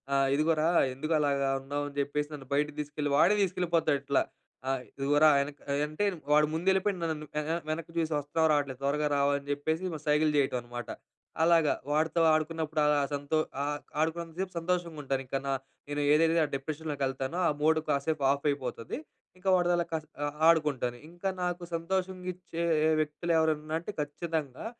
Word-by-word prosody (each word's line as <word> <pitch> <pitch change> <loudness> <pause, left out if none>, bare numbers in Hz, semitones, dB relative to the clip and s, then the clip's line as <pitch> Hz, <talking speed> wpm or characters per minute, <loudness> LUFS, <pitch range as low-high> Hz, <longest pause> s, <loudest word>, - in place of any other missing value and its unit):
ఆహ్, 135 0 +3
"ఇదిగోరా 155 +1 +2 0.3
ఎందుకు 155 +4 -2
అలాగా 140 -2 +1
ఉన్నావు?" 145 +2 -3
అని 140 - -16
జెప్పేసి 145 +1 -1
నన్ను 135 -3 -8
బయటికి 150 +1 0
తీసుకెళ్ళి 145 0 -3
వాడే 190 +7 +5
తీసుకెళ్ళిపోతాడు 170 -5 +1
ఇట్లా. 140 0 +2 0.5
ఆహ్, 135 -2 0 0.2
ఇదిగోరా 145 +3 +5
వెనక్ 140 +1 -4 0.3
అంటే 155 +7 -3 0.3
వాడు 150 0 +5
ముందు 170 +4 -3
వెళ్ళిపోయి 190 +1 +2
నన్ను 155 -2 -2 0.4
వెనక్కి 165 +1 -3
చూసి 165 -1 0
వస్తావా? 145 +3 -1
రావట్లేదు. 140 -3 0
త్వరగా 150 +2 +1
రావాలని 140 0 +1
చెప్పేసి 160 +5 -2 0.2
సైగల్ 150 +1 +3
జేయటం 135 -3 +2
అనమాట. 120 0 -7 0.5
అలాగా. 165 -3 +4 0.2
వాడితో 160 +2 +2
ఆడుకున్నప్పుడు 155 0 0
అలా 150 -1 +4
సంతో 145 +2 -1 0.3
ఆహ్, 145 0 -2 0.2
ఆడుకున్నంత 165 +1 -1
సేపు 190 -1 -4
సంతోషంగా 170 -2 -2
ఉంటాను. 135 -1 -1
ఇంక 135 - -4
నా 135 - +1 0.4
నేను 145 0 -1
ఏదైతే 165 +2 +4
ఆ - - -4
డిప్రెషన్‌లోకి 150 +1 -4
వెళ్తానో 135 +5 -3
ఆ - - +4
మూడ్ 160 +1 +4
కాసేపు 140 +1 0
ఆఫ్ 140 +1 -2
అయిపోతది. 125 - -3 0.4
ఇంకా 190 +1 -2
వాడితో 175 -1 +2
అలా 170 - 0
కా - - +2 0.5
ఆడుకుంటాను. 150 -7 +2
ఇంకా 175 +3 -3
నాకు 175 0 -2
సంతోషంగ 185 +2 -2
ఇచ్చే 175 -1 -5 0.4
వ్యక్తులు 160 +3 -2
ఎవరన్నా 155 -1 +1
అంటే 170 - -6
ఖచ్చితంగా 150 - -4
150 Hz, 160 wpm, -30 LUFS, 140-165 Hz, 0.5 s, వాడే